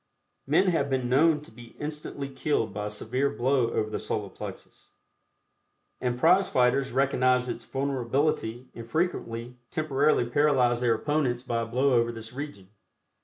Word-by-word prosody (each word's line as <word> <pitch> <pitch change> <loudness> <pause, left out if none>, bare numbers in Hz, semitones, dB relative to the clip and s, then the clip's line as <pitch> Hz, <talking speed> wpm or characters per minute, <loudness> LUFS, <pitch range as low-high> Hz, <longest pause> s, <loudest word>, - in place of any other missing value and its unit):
Men 170 +7 +4
have 145 -5 +1
been 130 -2 0
known 150 +4 +4
to 150 - -13
be 120 -1 -14
instantly 150 -2 -5
killed 135 -3 -1
by 105 0 -3
a - - -3
severe 125 +6 -1
blow 130 -3 +1
over 110 - -1
the - - -2
Solar - - -3
Plexus, - - -10 1.1
and 125 -1 -1
prize 185 +8 +4
fighters 130 +2 +2
recognize 130 -1 +2
its 120 -1 -5
vulnerability 130 -2 -1
and 115 0 -9
frequently 125 -8 -2
temporarily 145 -4 +2
paralyze 125 -2 +2
their 120 -2 +3
opponents 130 -1 0
by 115 -3 -1
a 115 - -3
blow 130 +4 +2
over 120 -1 +3
this 115 0 -9
region. 135 -9 -7
130 Hz, 155 wpm, -27 LUFS, 120-145 Hz, 1.1 s, Men